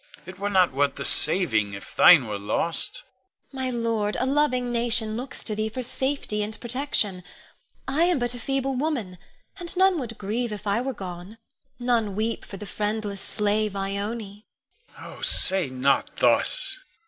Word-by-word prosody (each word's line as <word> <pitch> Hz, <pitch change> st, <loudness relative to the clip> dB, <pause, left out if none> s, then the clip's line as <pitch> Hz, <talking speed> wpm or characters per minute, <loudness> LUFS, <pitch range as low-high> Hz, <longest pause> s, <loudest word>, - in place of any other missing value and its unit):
It 185 Hz, 0 st, -11 dB
were 205 Hz, +1 st, -2 dB
not 185 Hz, -3 st, +3 dB
worth 140 Hz, +1 st, 0 dB
the -, -, -5 dB
saving 110 Hz, -, +5 dB
if 100 Hz, -, -10 dB
thine 165 Hz, -8 st, +7 dB
were 105 Hz, -2 st, -5 dB
lost. 165 Hz, -, -1 dB
Ione. -, -, -41 dB
My -, -, -1 dB
lord, 230 Hz, -3 st, -2 dB
a -, -, 0 dB
loving 260 Hz, -3 st, 0 dB
nation 230 Hz, -2 st, 0 dB
looks 255 Hz, +3 st, -7 dB
to 215 Hz, -, -3 dB
thee 215 Hz, +1 st, -2 dB
for 255 Hz, +3 st, -6 dB
safety 265 Hz, -4 st, -3 dB
and 215 Hz, +1 st, -6 dB
protection. 240 Hz, -7 st, -2 dB, 0.6 s
I 295 Hz, +6 st, +1 dB
am 355 Hz, -2 st, +1 dB
but 240 Hz, -1 st, -2 dB
a 245 Hz, -, -8 dB
feeble 270 Hz, +1 st, -2 dB
woman, 250 Hz, -, -3 dB, 0.4 s
and 350 Hz, +1 st, -7 dB
none 375 Hz, -2 st, +3 dB
would 230 Hz, -4 st, -7 dB
grieve 225 Hz, +3 st, -3 dB
if 210 Hz, 0 st, -8 dB
I 205 Hz, +3 st, 0 dB
were 265 Hz, 0 st, -4 dB
gone; 185 Hz, +2 st, -9 dB, 0.4 s
none 235 Hz, -5 st, -1 dB
weep 220 Hz, +2 st, -2 dB
for 195 Hz, -, -10 dB
the 210 Hz, -, -9 dB
friendless 210 Hz, -1 st, -4 dB
slave, 210 Hz, 0 st, -1 dB
Ione. 200 Hz, +2 st, -5 dB, 0.5 s
Con. -, -, -12 dB
Oh, -, -, -11 dB
say 185 Hz, -6 st, +6 dB
not 130 Hz, +2 st, 0 dB
thus! -, -, +3 dB
215 Hz, 170 wpm, -24 LUFS, 195-250 Hz, 0.6 s, thine